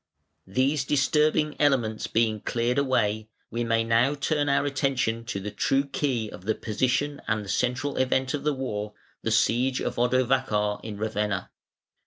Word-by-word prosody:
III. 95 - -16
These 140 +2 +2
disturbing 150 +2 +2
elements 125 -7 +1
being 110 -1 +1
cleared 120 +3 0
away, 110 -6 0 0.2
we 120 +1 -1
may 115 -1 +1
now 115 +5 +2
turn 145 +1 0
our 140 +1 +2
attention 135 -5 0
to 115 -4 -3
the 105 +2 -5
true 135 +6 +1
key 135 -5 -1
of 95 - -11
the 110 0 +1
position 135 +6 -1
and 110 -2 0
the - - -9
central 125 +6 -1
event 130 0 +1
of 145 -1 -3
the 150 -1 +1
war, 105 -5 -4 0.3
the - - -1
siege 125 +4 +2
of - - -3
Odovacar 120 -4 +1
in 110 -2 -6
Ravenna. 105 -2 -2
125 Hz, 165 wpm, -26 LUFS, 110-140 Hz, 0.3 s, These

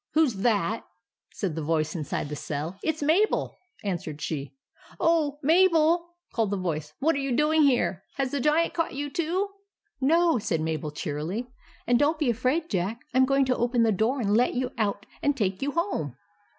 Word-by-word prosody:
" - - -60
Who 315 0 +5
's 230 -6 -4
that? 215 -1 +1 0.3
" - - -66
said 190 -6 -2
the 160 - -3
voice 155 +1 0
inside 150 -2 -3
the 150 - -4
cell. 150 +4 -4
" - - -29
It 315 -1 0
's 300 - -4
Mabel," 350 +9 +2 0.2
answered 170 -6 -3
she. 145 -2 -3
m 270 - -24
Oh! 310 -3 +2
Mabel? 335 +1 +4
" 350 - -41
called 225 -3 +1
the 200 - -1
voice. 155 -4 -3
" - - -56
What 320 +4 +3
are - - -1
you 275 -3 -1
doing 310 +2 +3
here? 245 - +2
Has 270 -2 -1
the 285 - -1
Giant 300 +5 +2
caught 330 -5 -1
you 290 +1 -3
too?" 360 +5 -1 0.3
" 410 -9 -47
No," 335 -5 +4
said 165 -5 -1
Mabel, 155 -1 -2
cheerily; 155 +11 -4 0.2
" - - -28
and 245 0 +3
don't 300 +2 +3
be 295 -6 +2
afraid, 255 +8 0
Jack. 200 - -2
I - - +1
'm 260 - +6
going 275 0 +3
to 255 -1 +1
open 240 0 +2
the 225 - +3
door, 220 +7 +1
and 205 -3 +1
let 245 +3 +3
you 250 0 -1
out 205 -2 -1 0.2
and 285 -1 +1
take 195 -5 -1
you 280 +1 -1
home." 240 - -2
250 Hz, 225 wpm, -27 LUFS, 185-305 Hz, 0.3 s, m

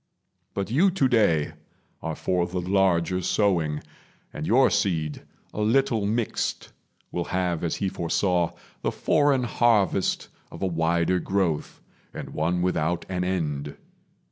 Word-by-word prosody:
But 100 +2 -2
you 170 +10 +4
today 115 - +2 0.5
Are - - -3
for 90 -1 0
the 90 +1 -3
larger 90 -1 +2
sowing; 85 -7 +1 0.5
and 75 - -4
your 130 +4 +5
seed, 85 -7 0 0.3
A 105 - -3
little 115 -1 +2
mixed, 115 +1 -2 0.4
will 85 -1 -2
have, 90 -3 -1
as 85 - 0
He 100 - -1
foresaw, 85 -1 0 0.3
The - - 0
foreign 145 -4 +2
harvest 110 -5 +2 0.2
of - - -7
a - - +3
wider 85 +1 +1
growth, 90 -4 -1 0.3
And - - -6
one 85 +3 0
without 85 -1 0
an 90 -1 -1
end. 75 -6 -2
90 Hz, 130 wpm, -25 LUFS, 85-105 Hz, 0.5 s, your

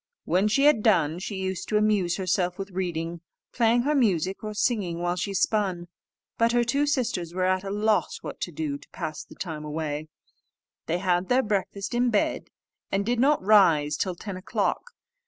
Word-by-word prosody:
When 185 +4 +2
she 245 +6 +2
had 295 -7 +5
done, 170 -7 +2
she 195 +2 -5
used 190 -1 -4
to 215 - +2
amuse 210 -5 +2
herself 180 -1 0
with 195 0 -6
reading, 170 -2 -3 0.3
playing 235 0 +3
her 295 +3 +1
music, 195 - +1
or 215 0 -5
singing 205 -6 0
while 175 +1 -1
she 200 +2 -3
spun. 185 -5 0 0.5
But 230 +1 +3
her 240 0 +3
two 280 +5 +1
sisters 220 - -1
were 185 0 +1
at 185 0 +1
a 195 - -5
loss 210 +2 +1
what - - -7
to 175 - -3
do 145 -2 -3
to - - -19
pass 155 - -5
the - - -15
time 160 -4 -5
away: 150 0 -4 0.8
they 170 - 0
had 180 0 0
their 255 +1 +3
breakfast 200 0 -2
in 245 +1 +2
bed, 210 -3 0 0.4
and 200 +1 0
did 240 +1 0
not 280 -2 +3
rise 165 -8 +5
till 185 +2 -2
ten 195 +1 -7
o'clock. 480 - -2
190 Hz, 190 wpm, -26 LUFS, 175-220 Hz, 0.8 s, had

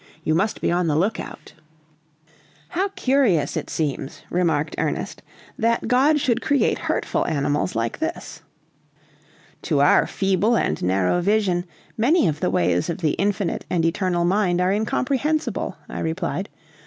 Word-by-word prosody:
You 155 - +1
must 195 +7 0
be - - +1
on 175 0 +1
the 150 - +1
lookout." 195 +8 -2 1.2
"How 380 +3 0
curious 255 - +2
it - - -4
seems," 145 -3 -3
remarked 165 -4 +1
Ernest, - - -2 0.4
"that 230 +1 +1
God 280 +5 +4
should 240 -3 +1
create 280 -2 +1
hurtful - - -1
animals 145 -4 0
like 115 0 -2
this." - - -4 1.2
"To 150 -4 0
our 145 - +5
feeble 195 +4 +1
and - - -1
narrow 95 - +1
vision 190 -2 +1 0.3
many 275 - +4
of 155 -2 -1
the - - 0
ways 90 - +1
of 170 - -2
the 160 -4 0
Infinite 200 0 -1
and 170 -2 +1
Eternal 175 0 0
Mind 180 -1 +2
are 180 +1 +2
incomprehensible," 270 +8 -1
I - - -6
replied. 170 +3 -2
180 Hz, 140 wpm, -22 LUFS, 155-220 Hz, 1.2 s, our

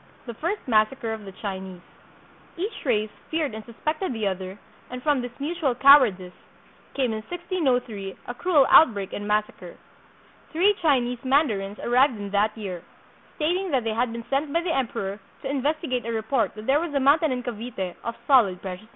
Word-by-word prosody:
The 235 - -6
First 340 - -3
Massacre 225 +1 +1
of 215 -2 -8
the 195 - -8
Chinese 190 -2 -5 0.8
Each 395 +6 -4
race 215 -4 +1 0.2
feared 315 -6 -1
and 220 0 -7
suspected 305 - -3
the 220 -2 -3
other, 190 0 -3 0.3
and 250 0 -7
from 290 -4 +2
this 245 +2 -8
mutual 295 -3 -1
cowardice 240 -10 +6 0.6
came 260 -4 +1
in 215 - -4
1603 260 - -2
a 245 - -5
cruel 300 0 +3
outbreak 205 -10 +5
and 205 - -5
massacre. 210 0 -2 0.7
Three 370 +6 +4
Chi 295 -6 +4
nese 240 0 -4
mandarins 225 -8 +1
arrived 250 0 +3
in 200 -1 -6
that 210 +2 +1
year, 190 -5 -5 0.5
stating 360 +5 0
that 265 -6 +1
they 225 -1 -1
had 235 +2 0
been 230 0 -6
sent 280 +2 -1
by 335 +3 +1
the 340 -1 -1
emperor 205 -6 -2 0.2
to - - -3
investigate 280 -2 -1
a 230 - -4
report 220 -1 -1
that 215 0 -9
there 275 +4 +3
was 325 -3 -4
a - - +3
mountain 290 +3 +4
in 250 -1 -2
Cavite 225 -6 -5
of 235 - -4
solid 225 -10 +4
precious 185 -1 -6
metal. - - -25
245 Hz, 185 wpm, -25 LUFS, 210-290 Hz, 0.8 s, cowardice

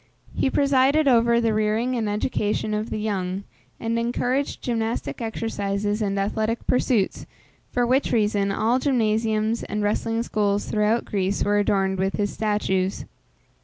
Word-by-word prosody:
He - - +1
presided 280 +2 +3
over 235 -2 +4
the 230 -2 +1
rearing 215 +4 0
and 220 -3 -1
education 210 0 -1
of 215 +2 -2
the - - -3
young, 195 -3 -2 0.4
and 230 0 -1
encouraged 245 +3 -1
gymnastic 230 0 -2
exercises 210 -2 -2
and 200 -1 -1
athletic 215 +3 -1
pursuits, 245 -5 +1 0.4
for 245 -1 +1
which 260 +3 +1
reason, 205 -3 +1
all 230 +5 +1
gymnasiums 220 -4 +1
and 210 0 -3
wrestling 225 +2 0
schools 205 -3 0
throughout 215 +2 +1
Greece 195 -1 -1
were 205 0 +2
adorned 195 -2 +1
with 190 +1 0
his 205 -1 -1
statues. 195 -3 -1
215 Hz, 140 wpm, -24 LUFS, 205-235 Hz, 0.4 s, over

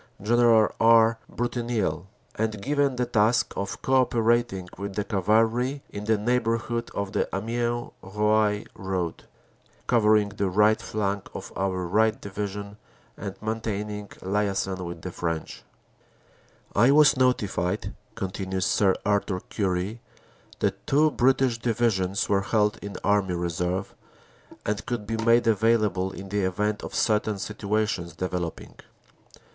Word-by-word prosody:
General 115 0 +4
R. 115 0 +5
Brutinel, 120 -6 -2 0.3
and 110 -1 -2
given 140 +3 +1
the 125 0 0
task 115 0 +2
of 100 0 -4
co 130 0 +4
operating 115 -6 +1
with 100 0 -6
the 105 - 0
cavalry 115 +7 +1
in 100 0 -6
the 110 0 +2
neighborhood 115 +1 0
of 100 -1 -2
the - - 0
Amiens 120 +3 -2
Roye 105 +1 +1
road, 95 -3 -3 0.6
covering 110 -3 +4
the 100 -1 -2
right 105 +3 +3
flank 100 -2 -2
of - - -7
our 95 -1 -1
right 110 +6 +2
division 100 -1 -5 0.4
and 100 -1 -6
maintaining 105 -2 -3 0.2
liason 95 -1 -1
with 85 -2 -7
the 90 - -4
French. 85 -2 -4 1.1
"I 115 +5 +5
was 150 0 +6
notified," 105 -7 0 0.2
continues 95 -1 -3
Sir 95 -2 +3
Arthur 100 -2 +1
Currie, 100 +3 -1 0.6
"that - - -1
two 150 +2 +4
British 130 -2 +2
Divisions 105 -5 0
were 100 -1 +2
held 105 +1 +1
in 100 0 -7
Army 100 -3 +2
Reserve, 90 +2 -2 0.7
and 105 +1 -1
could 120 -4 -3
be 115 +2 -2
made 115 +1 +3
available 105 -4 +2
in 95 0 -9
the 105 +1 -1
event 105 +3 -1
of - - -6
certain 105 -1 +1
situations 105 -4 -2
developing. 90 -1 -4
105 Hz, 130 wpm, -26 LUFS, 95-115 Hz, 1.1 s, was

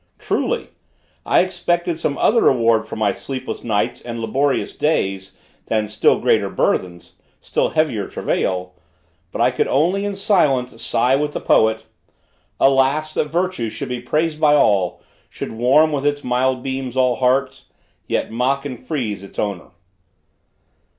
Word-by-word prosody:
Truly! - - -2 0.6
I - - +5
expected 175 -2 -1
some 145 -3 -1
other 230 +1 +3
reward 115 -3 +3
for - - -6
my 105 -2 +1
sleepless 130 +5 -6
nights 105 -3 -1
and 115 -1 -6
laborious 135 +5 -1
days, 95 -10 -1 0.3
than 110 -1 0
still 105 - +2
greater - - +2
burthens, 85 -1 -2 0.3
still - - -1
heavier 150 -11 0
travail. 90 -1 -2 0.6
But - - -3
I - - +4
could - - 0
only 175 +8 +1
in 205 -1 -3
silence 145 - +1
sigh 125 +3 +2
with 150 +1 -1
the - - -3
poet: 110 0 +2 0.7
"Alas! 135 +3 +2
that - - 0
Virtue 170 -7 -2
should 135 +4 -6
be 125 -1 -3
praised 155 +5 -1
by 150 -1 +5
all, 100 -10 +2 0.3
Should - - -6
warm, 130 +8 +3
with 140 -2 -2
its 145 0 -1
mild 125 +1 0
beams, 130 -1 -4
all 125 -2 +2
hearts: 130 +2 0 0.4
Yet - - -1
mock 135 +4 0
and 125 -4 -7
freeze 125 -9 -3
its 100 - -13
owner." 100 -4 -3
130 Hz, 150 wpm, -20 LUFS, 110-150 Hz, 0.7 s, I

